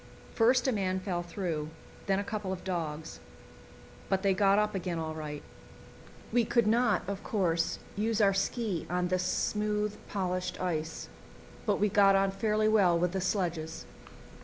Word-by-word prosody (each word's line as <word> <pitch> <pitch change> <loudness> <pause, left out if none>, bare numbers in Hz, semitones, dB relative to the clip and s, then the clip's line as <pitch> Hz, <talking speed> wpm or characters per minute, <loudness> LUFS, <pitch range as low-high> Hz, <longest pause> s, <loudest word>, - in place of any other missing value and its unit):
First 245 +3 +3
a - - +3
man 190 -4 0
fell 185 -2 -2
through, 170 -4 -3 0.4
then 195 -1 +2
a 200 - -1
couple 205 -2 -4
of 185 -1 -5
dogs; 160 -4 -4 0.9
but 190 0 +1
they 195 -1 +4
got 195 +1 +4
up 210 0 +1
again 180 -3 -2
all 160 -1 -3
right. 150 -2 -6 0.9
We 240 - +3
could 235 0 +2
not, 220 -2 +3
of 200 0 -4
course, 170 -5 0 0.2
use 220 +1 0
our 200 -2 +5
ski 195 -2 -1
on 180 0 0
this 185 0 +1
smooth 210 +2 0
polished 185 -2 -2
ice, 160 -3 -3 0.6
but - - +2
we 210 - +3
got 200 -1 +5
on 195 0 +3
fairly 215 +2 +1
well 195 -6 +4
with 175 +1 +1
the 190 0 -2
sledges. 175 -4 -2
195 Hz, 160 wpm, -30 LUFS, 175-210 Hz, 0.9 s, our